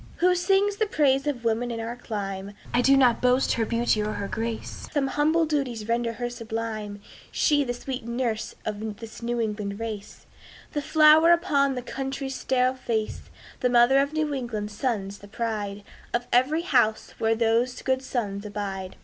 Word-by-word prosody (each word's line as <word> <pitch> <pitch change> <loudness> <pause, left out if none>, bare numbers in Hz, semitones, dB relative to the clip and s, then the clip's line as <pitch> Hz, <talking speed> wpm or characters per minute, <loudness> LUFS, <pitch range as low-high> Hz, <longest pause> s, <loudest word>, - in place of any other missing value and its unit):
"Who 360 +2 +3
sings 390 +3 +2
the 435 0 +1
praise 280 -6 +2
of 260 -5 -2
woman 230 +2 +1
in 230 -1 -4
our 230 +1 -4
clime? 200 -4 -5 0.2
I 245 - +4
do 275 +2 +5
not 250 -3 +4
boast 250 +1 +3
her 225 -2 0
beauty 230 -2 +1
or 210 0 -2
her 200 - -4
grace: 225 +1 -4
Some 290 -3 +1
humble 310 +4 +2
duties 265 -8 -2
render 235 0 0
her 240 +1 -3
sublime, 225 -3 -5 0.3
She, 290 -1 +3
the 245 -2 -3
sweet 255 0 -5
nurse 235 -1 -2
of 210 0 -4
this 225 0 -10
New 240 0 -2
England 210 -2 -3
race, 215 -2 -6 0.5
The 295 - -2
flower 310 +2 +6
upon 285 -6 +3
the 250 - -4
country's 270 +1 -4
sterile 255 -1 +1
face; 230 -4 -3 0.3
The 250 - +2
mother 245 +2 +5
of 280 +1 +1
New 310 -1 -1
England's 220 -6 -4
sons, 205 -5 -2
the 205 - -13
pride 205 -2 -3 0.3
Of 240 0 -1
every 280 +7 +3
house 220 -10 +2
where 225 0 +2
those 230 +2 +1
good 260 -1 +1
sons 210 -6 -3
abide." 195 -3 -5
240 Hz, 175 wpm, -26 LUFS, 220-270 Hz, 0.5 s, flower